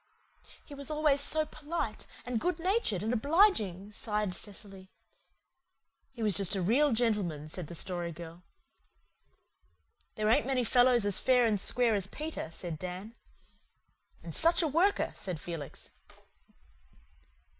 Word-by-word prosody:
"He 290 - -11
was 280 -1 -4
always 300 -2 +2
so 310 +2 0
polite 310 +3 -5 0.2
and 245 -2 -1
good 360 -2 0
natured 355 - 0
and 225 +3 -1
obliging," 220 - +2
sighed 210 -2 -1
Cecily. 195 -1 -7 1.2
"He 235 -3 -6
was 210 -3 +3
just 195 0 +2
a 190 - -1
real 270 +10 +3
gentleman," 210 -10 0
said 165 +1 -4
the 170 - -8
Story 175 0 -3
Girl. 170 +1 -10 1.7
"There 215 0 -1
ain't 225 +2 +3
many 260 -2 +1
fellows 245 -1 +4
as 205 -2 +3
fair 250 -2 +4
and 215 -3 +1
square 235 +3 +3
as 195 -3 0
Peter," 305 - -5
said 165 -1 -6
Dan. 185 +5 -6 1.1
"And - - -7
such 335 +1 +4
a - - +2
worker," 345 +8 +2
said 180 -5 -5
Felix. 160 -4 -7
220 Hz, 135 wpm, -31 LUFS, 185-280 Hz, 1.7 s, fellows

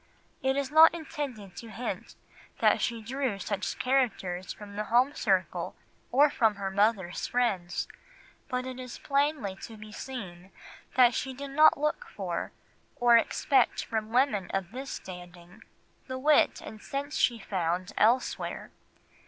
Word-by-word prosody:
It 265 +1 +1
is 280 -1 -1
not 320 +2 +8
intended 270 - -6
to 230 - -8
hint 235 +3 -5 0.4
that - - +3
she 230 -2 -2
drew 260 -2 -2
such 200 0 -3
characters 215 -9 0
from 205 -1 -10
the 210 +1 -2
home 250 +6 +3
circle 190 -8 0 0.4
or 285 +3 +5
from 220 -4 +2
her 195 -1 -4
mother's 200 -3 +1
friends, 200 -8 0 0.6
but 250 0 -2
it 260 0 -6
is 250 -2 -7
plainly 280 -8 0
to 225 +2 -9
be 215 0 -11
seen 195 -8 -8 0.5
that 245 -1 +6
she 265 +1 -3
did 280 +1 -7
not 310 +3 +6
look 300 +11 -1
for, - - -3 0.4
or 240 -1 +5
expect 265 +3 +2
from 220 -1 -3
women 240 -7 +2
of 190 -2 -2
this 265 +2 -6
standing, 175 -1 -10 0.5
the 260 0 -4
wit 295 +3 +3
and 215 -1 -10
sense 285 +2 -4
she 245 -2 +2
found 180 -3 -2
elsewhere. 240 +4 +1
235 Hz, 145 wpm, -29 LUFS, 195-265 Hz, 0.6 s, not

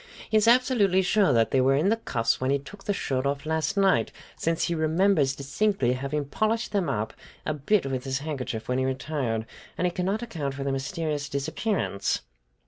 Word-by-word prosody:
"He - - +1
is 215 +1 +4
absolutely 235 -6 +4
sure 200 -2 +3
that 115 -3 +3
they 130 - +3
were 135 +1 +4
in 155 +8 +2
the 225 - +4
cuffs 115 - 0
when 130 - 0
he 140 - +3
took 195 +9 -12
the - - +1
shirt 135 -8 -1
off 140 +1 -2
last 160 +5 -1
night, 195 -1 +3 0.2
since 165 0 0
he 170 - 0
remembers 160 -3 +2
distinctly 140 - 0
having 140 +3 -2
polished 215 +10 -1
them 200 -4 0
up 105 +1 -2 0.3
a 155 - 0
bit 155 +6 +1
with 130 -1 -3
his 130 -1 -1
handkerchief 130 -6 -4
when 125 +1 0
he 130 - +1
retired, 130 -4 -2 0.3
and 180 - 0
he 180 - +2
cannot 195 +5 -1
account 150 -12 -4
for 140 - -4
their 135 0 -1
mysterious 145 +1 -2
disappearance. 140 - -1
150 Hz, 200 wpm, -26 LUFS, 135-195 Hz, 0.3 s, is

